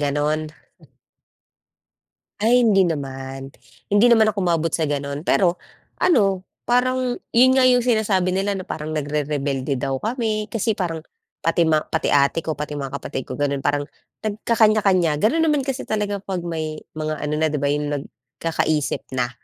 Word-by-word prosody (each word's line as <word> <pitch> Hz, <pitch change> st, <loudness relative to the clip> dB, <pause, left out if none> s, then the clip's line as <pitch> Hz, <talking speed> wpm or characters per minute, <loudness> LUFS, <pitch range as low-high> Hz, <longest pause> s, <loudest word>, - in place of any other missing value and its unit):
ganun. 150 Hz, +2 st, 0 dB, 1.9 s
Ay 240 Hz, +2 st, +4 dB
hindi 195 Hz, -3 st, +5 dB
naman, 135 Hz, -4 st, -4 dB, 0.3 s
hindi 205 Hz, +4 st, +4 dB
naman 225 Hz, -2 st, +6 dB
ako 200 Hz, -, -2 dB
umabot 165 Hz, -2 st, +1 dB
sa 160 Hz, -3 st, 0 dB
gano'n. 140 Hz, 0 st, -3 dB
Pero 175 Hz, 0 st, +3 dB, 0.5 s
ano, 195 Hz, -, +3 dB, 0.2 s
parang 250 Hz, 0 st, +1 dB, 0.2 s
yun 255 Hz, +2 st, +5 dB
nga 265 Hz, -, +4 dB
yung 250 Hz, -1 st, +5 dB
sinasabi 200 Hz, -6 st, +1 dB
nila, 195 Hz, 0 st, 0 dB
na 185 Hz, -, -7 dB
parang 155 Hz, 0 st, -5 dB
nagrerebelde 145 Hz, -3 st, -2 dB
daw 135 Hz, +1 st, -2 dB
kami. 220 Hz, -2 st, -2 dB
Kasi 225 Hz, -1 st, 0 dB
parang 165 Hz, -5 st, -3 dB, 0.4 s
pati 165 Hz, +1 st, +2 dB
ma 160 Hz, -1 st, +3 dB
pati 160 Hz, -, -1 dB
ate 140 Hz, +3 st, +3 dB
ko, 155 Hz, -3 st, -4 dB
pati 150 Hz, 0 st, -4 dB
yung 145 Hz, -, -4 dB
mga 135 Hz, -, -6 dB
kapatid -, -, -5 dB
ko, 130 Hz, -, -6 dB
gano'n, 140 Hz, -1 st, -1 dB
parang 145 Hz, 0 st, 0 dB, 0.4 s
nagkakanya-kanya. 210 Hz, -7 st, +2 dB
Gano'n 320 Hz, +10 st, +3 dB
naman 295 Hz, -3 st, +2 dB
kasi 270 Hz, 0 st, -4 dB
talaga, 205 Hz, -2 st, -1 dB
'pag 190 Hz, -2 st, -4 dB
may 160 Hz, -2 st, -4 dB, 0.2 s
mga 155 Hz, -1 st, -3 dB
ano 150 Hz, 0 st, -1 dB
na, 160 Hz, -, +2 dB
'di 150 Hz, -1 st, -1 dB
ba, 140 Hz, -, +2 dB
yung 150 Hz, 0 st, -1 dB, 0.2 s
nagkakaisip 145 Hz, +5 st, -3 dB
na. 125 Hz, -1 st, 0 dB
165 Hz, 160 wpm, -22 LUFS, 145-215 Hz, 1.9 s, naman